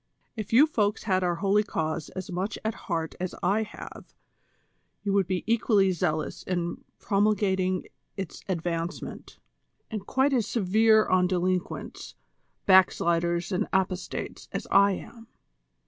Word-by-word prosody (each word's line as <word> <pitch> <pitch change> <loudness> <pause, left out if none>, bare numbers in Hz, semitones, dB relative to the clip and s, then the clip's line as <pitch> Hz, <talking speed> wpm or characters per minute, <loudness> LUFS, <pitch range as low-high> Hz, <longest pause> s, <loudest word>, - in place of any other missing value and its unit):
If 215 -3 -6
you 255 +6 +7
folks 210 -8 0
had 185 -3 +1
our 175 -1 +1
holy 200 +3 +2
cause 160 -6 -3
as 190 +1 -5
much 185 +4 -2
at 220 - 0 0.2
heart 165 -2 -1
as 185 0 -3
I 200 +4 +2
have, 215 - -9 0.9
you 200 -1 0
would 195 -3 +2
be 185 -1 -1
equally 215 -4 +3
zealous 160 -3 -2
in 175 -2 -3
promulgating 195 -3 +1 0.3
its 190 -5 -6
advancement, 170 -1 -4 0.5
and 210 -3 -5
quite 270 +2 +2
as 235 -5 +1
severe 220 +1 +4
on 185 -1 +3
delinquents, 180 0 -2 0.5
back 190 -1 +7
sliders 170 +2 0
and 180 - 0
apostates 185 -1 -2
as - - -4
I 200 0 +6
am." 230 +4 -9
190 Hz, 135 wpm, -27 LUFS, 180-210 Hz, 0.9 s, you